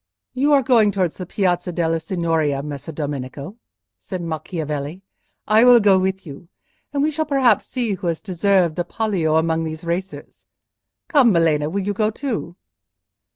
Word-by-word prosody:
"You 275 +3 +1
are 275 -2 +4
going 230 -4 +4
towards 185 -4 -1
the 185 - -6
Piazza 180 -2 0
della 165 -1 0
Signoria, 160 -4 -1
Messer 145 +1 -7
Domenico," 145 - -6 0.4
said 185 - -6
Macchiavelli. 160 0 -5 0.4
"I 215 +2 +5
will 245 -1 +8
go 200 -3 +4
with 190 0 -2
you, 150 +2 -11 0.4
and 285 -1 0
we 310 - +1
shall 310 +1 -2
perhaps 265 -7 +2
see 245 -4 -2
who 180 -2 -4
has 165 -2 -1
deserved 185 -3 +1
the 175 - 0
palio 180 -5 -1
among 160 0 +1
these 160 +1 -6
racers. 180 +3 -5 0.6
Come, 280 -9 +4
Melema, 160 -4 +2
will 200 +2 -2
you 205 +2 -1
go 215 +2 +1
too?" 220 -7 -4
180 Hz, 160 wpm, -21 LUFS, 160-215 Hz, 0.6 s, will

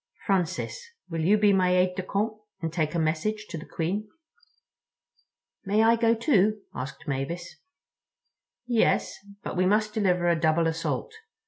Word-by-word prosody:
Francis, 190 - -1 0.3
will 165 -1 -2
you 195 +7 +4
be 205 -1 +4
my 180 -1 +3
aide 180 0 +3
de 190 - -2
camp 205 +4 -1 0.3
and 165 -2 -4
take 155 -2 -1
a - - +1
message 165 +8 -1
to - - -7
the 160 - -7
Queen?" 195 +6 -3 1.5
"May 210 +2 +2
I 230 +1 +5
go, 230 0 +3
too?" 215 -4 +2
asked 140 +5 -7
Mavis. 145 +6 -4 1.1
"Yes. 240 -2 +1 0.2
But - - -4
we 185 0 +2
must 210 +1 +2
deliver 180 -5 +1
a 170 - +4
double 160 +1 +2
assault. 165 - -2
185 Hz, 150 wpm, -27 LUFS, 165-215 Hz, 1.5 s, I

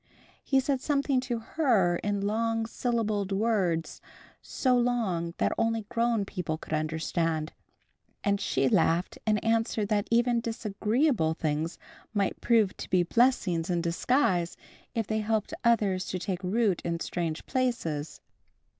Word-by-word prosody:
He 270 - +3
said 265 -1 0
something 280 -2 +1
to 250 -2 -2
Her 225 - +2
in 205 +1 -2
long 225 +2 0
syllabled 215 -4 -1
words, 195 -6 0 0.4
so 255 -2 +1
long 215 -9 0
that - - +1
only 225 -1 +1
grown 235 -3 +1
people 180 -5 -3
could 160 - -8
understand. 160 +1 -1 0.7
And 200 -1 +1
she 135 0 +1
laughed 165 +6 +2
and 215 -1 +3
answered 225 -2 +1
that 205 -1 +1
even 235 +1 +3
disagreeable 220 - 0
things 155 +1 -2 0.4
might 200 -1 0
prove 225 -5 +3
to - - -7
be 180 -1 +3
blessings 190 -5 +2
in 175 -1 +1
disguise, 175 0 +1 0.4
if 225 -2 0
they 220 +1 -1
helped 220 +4 -1
others 205 -6 +2
to 185 - -2
take 185 0 -4
root 200 0 +1
in 170 0 -2
strange 165 -2 -3
places. 170 - -2
210 Hz, 135 wpm, -28 LUFS, 175-235 Hz, 0.7 s, He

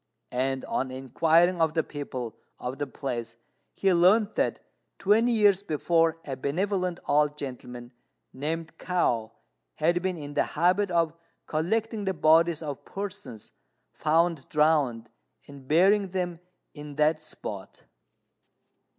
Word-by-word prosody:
And, 130 +1 -1
on 130 - -2
inquiring 160 +7 +2
of 160 0 +2
the 160 - +2
people 130 -6 -6 0.2
of 130 +3 -5
the 145 - -2
place, 120 -5 -5 0.4
he 195 -1 +2
learnt 200 +5 +4
that - - 0 0.4
twenty 220 +5 +3
years 205 -4 +4
before 165 -2 +1
a 135 - -4
benevolent 180 +6 -1
old 150 0 +2
gentleman, 125 -3 -7 0.4
named 160 +4 -4
Kao, 120 -11 0 0.4
had 170 +3 +1
been 185 -1 -2
in 145 -2 -7
the - - +2 0.2
habit 180 +5 +3
of 165 -2 +1 0.3
collecting 210 +7 -1
the 190 -1 -1
bodies 165 +1 +4
of 145 -3 -6
persons 200 - -7 0.4
found 165 -1 +1
drowned, 150 -7 +2 0.4
and 140 -2 -13
burying 195 +6 +4
them 175 -2 -3 0.3
in 150 -2 -9
that 155 +1 +2
spot. 100 -10 -8
160 Hz, 125 wpm, -27 LUFS, 140-180 Hz, 0.4 s, learnt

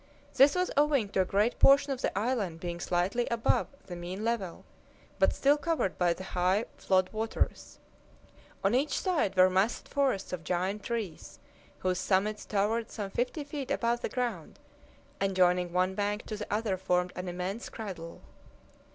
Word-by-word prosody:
This 275 +4 +6
was 365 0 0
owing 285 -7 +3
to 195 - +1
a - - +1
great 205 +6 +1
portion 275 0 +6
of 260 - -7
the - - -1
island 205 -7 -1
being 175 0 -5
slightly 180 +8 0
above 235 -1 +1 0.2
the 175 - -7
mean 180 +4 -6
level, 215 -7 -2 0.5
but - - +5
still 285 +2 +3
covered 315 - -1
by 175 -1 +3
the 185 - -4
high 185 +3 +1
flood 185 -1 +1
waters. 220 +1 -2 0.9
On 195 +3 +3
each 275 +4 +1
side 320 - 0
were 185 0 +7
massed 190 +5 0
forests 265 -11 0
of 175 -3 -4
giant 185 +5 -1
trees, 220 -9 -5 0.4
whose 185 0 -1
summits 205 +3 0
towered 215 +3 0
some 200 -3 -5
fifty 250 +7 -2
feet 285 -2 -6
above 240 -3 0
the - - -2
ground, 235 - -3 0.6
and 195 -1 0
joining 180 -1 +3
one 185 +1 +1
bank 205 +2 -2
to 215 - -5
the 210 0 -7
other 210 -2 0
formed 180 -1 0
an 180 0 -5
immense 180 +5 -4
cradle. 185 -7 -7
200 Hz, 170 wpm, -30 LUFS, 185-240 Hz, 0.9 s, were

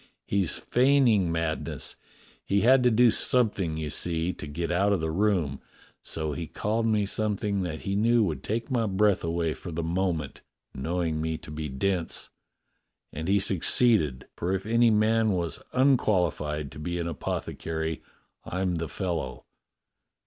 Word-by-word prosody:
He's 95 -6 0
feigning 125 -8 +3
madness. 80 -1 -2 0.5
He 100 0 +1
had 130 +2 +5
to 125 - +4
do 120 +1 +5
something, 105 - +2
you 75 -2 -4
see, 85 +2 0
to 75 - -8
get 85 +4 -3
out 100 +4 +2
of 95 - +1
the 80 0 -2
room, 85 -7 0 0.4
so 80 -1 -3
he 85 +2 -5
called 110 +6 -1
me 105 -2 +2
something 105 -1 -1
that 80 -4 -4
he 100 - -2
knew 115 +2 +3
would 80 -9 -2
take 115 - -3
my 115 -3 +1
breath 100 0 +2
away 85 -1 -1
for 90 - -8
the 85 +1 -3
moment, 85 -3 -2 0.3
knowing 80 +2 -2
me 80 0 -2
to 75 - -11
be 75 0 -4
dense, 85 +6 -2 0.8
and 80 +2 -5
he 100 +1 +3
succeeded, 95 - +3
for 85 - -2
if 95 0 -2
any 115 +1 +4
man 110 0 +3
was 85 -4 -2
unqualified 90 - +1
to - - -10
be 85 +3 -3
an 85 - -2
apothecary, 80 0 -4 0.4
I'm 90 -1 -2
the 85 0 -3
fel 90 -1 -2
low. 65 -5 -6
90 Hz, 160 wpm, -27 LUFS, 80-105 Hz, 0.8 s, had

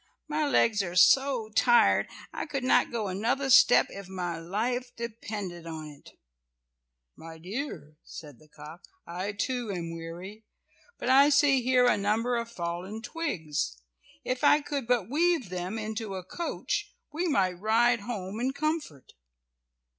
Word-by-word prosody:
My 305 0 0
legs 230 -6 +3
are 175 -2 -5
so 260 +2 +4
tired, 240 +2 +4 0.3
I - - -4
could 275 -3 -3
not 255 - +3
go 225 -3 -2
another 235 +8 -1
step 250 - +7
if 200 -1 -9
my 175 -3 -4
life 235 +9 -2
depended 205 -7 -6
on 160 -2 -7
it." 145 -1 -15 1.0
"My 165 0 -11
dear," 175 - -6
said 145 -5 -11
the 155 - -20
cock, 150 +3 -12 0.2
"I 185 +4 -4
too 240 +2 -3
am 170 -3 -4
weary, 175 +6 -8 0.5
but - - -5
I 275 +2 +7
see 280 -2 +4
here 250 0 +3
a 245 - +4
number 220 +5 0
of 235 0 -3
fallen 185 +2 -5
twigs. 160 - -3 0.5
If 255 +2 -3
I 295 +1 +5
could 285 -4 -4
but 240 -6 +1
weave 315 - +1
them 180 +4 -4
into 215 -2 -4
a 185 - -5
coach 345 - -4 0.2
we 345 +4 -1
might 185 - +1
ride 230 +4 +3
home 205 -2 -5
in 260 +2 -1
comfort." 305 - -3
220 Hz, 150 wpm, -28 LUFS, 180-255 Hz, 1.0 s, step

